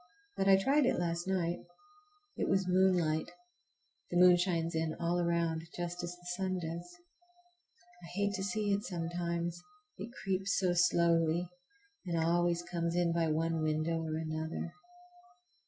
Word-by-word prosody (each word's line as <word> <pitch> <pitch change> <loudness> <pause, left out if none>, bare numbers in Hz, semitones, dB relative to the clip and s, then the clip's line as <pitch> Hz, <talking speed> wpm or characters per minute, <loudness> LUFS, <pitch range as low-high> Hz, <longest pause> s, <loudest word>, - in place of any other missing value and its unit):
But 195 - 0
I 195 -1 +7
tried 270 +7 +3
it - - +2
last 170 0 -2
night. 175 -2 0 0.8
It - - -1
was 190 -1 +2
moonlight. 180 -4 +2 0.8
The 175 - -1
moon 180 0 +8
shines 170 -2 0
in 160 -1 -1
all 170 +1 0
around, 170 -2 0 0.2
just 175 0 -3
as 175 0 -4
the 175 0 -20
sun 190 -1 -1
does. 170 +1 -5 1.1
I - - -9
hate 200 0 +1
to 190 -1 -3
see 205 +1 0
it 200 +1 0
sometimes, 170 0 -3 0.4
it - - -5
creeps 195 0 0
so 185 -2 +2
slowly, 170 -1 +3 0.6
and 170 -1 -1
always 170 +1 +2
comes 170 -1 -2
in 175 -1 +2
by 165 -1 +1
one 165 +1 0
window 155 +1 0
or 160 -1 -3
another. 160 +1 -4
175 Hz, 150 wpm, -33 LUFS, 165-180 Hz, 1.1 s, moon